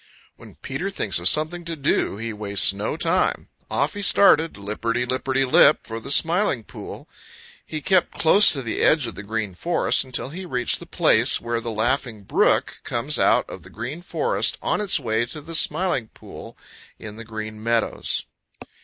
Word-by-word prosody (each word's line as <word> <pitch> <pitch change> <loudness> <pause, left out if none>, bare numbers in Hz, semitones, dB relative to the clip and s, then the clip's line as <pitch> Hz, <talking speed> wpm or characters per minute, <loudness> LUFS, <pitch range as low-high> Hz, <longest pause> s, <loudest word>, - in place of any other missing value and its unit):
When - - -15
Peter 155 +9 -5
thinks 105 - -3
of 85 +2 +7
something 160 +3 0
to 165 0 -5
do 140 -8 -1
he 115 +1 -5
wastes 100 -2 +3
no 105 +9 -4
time. 175 +3 0 0.2
Off - - -1
he 205 - -6
started, 165 -5 +4
lipperty 115 +4 -3
lipperty 130 +1 -1
lip, 140 +3 +5
for 115 0 -6
the 125 - -10
Smiling 165 - +3
Pool. - - -11 0.6
He 155 -1 -6
kept 185 +3 +1
close 200 +6 +6
to 135 -3 -2
the 115 - -3
edge 155 -4 +3
of 115 - -5
the - - -9
Green 105 -1 -4
Forest 170 - 0
until 130 -1 -4
he 180 +6 -8
reached 125 -9 -1
the - - -12
place - - +2
where 115 0 -3
the 115 - -5
Laughing 115 -1 -2
Brook - - +1
comes - - -2
out - - +2
of - - -10
the - - -15
Green 150 +7 -7
Forest 465 - -1
on - - -2
its 205 -6 0
way 110 -3 -1
to 150 - -8
the 160 +3 -11
Smiling 160 -6 +2
Pool - - -13 0.4
in 105 -1 -10
the 115 - -8
Green 110 -1 -8
Meadows. 115 0 -1
130 Hz, 180 wpm, -22 LUFS, 110-165 Hz, 0.6 s, of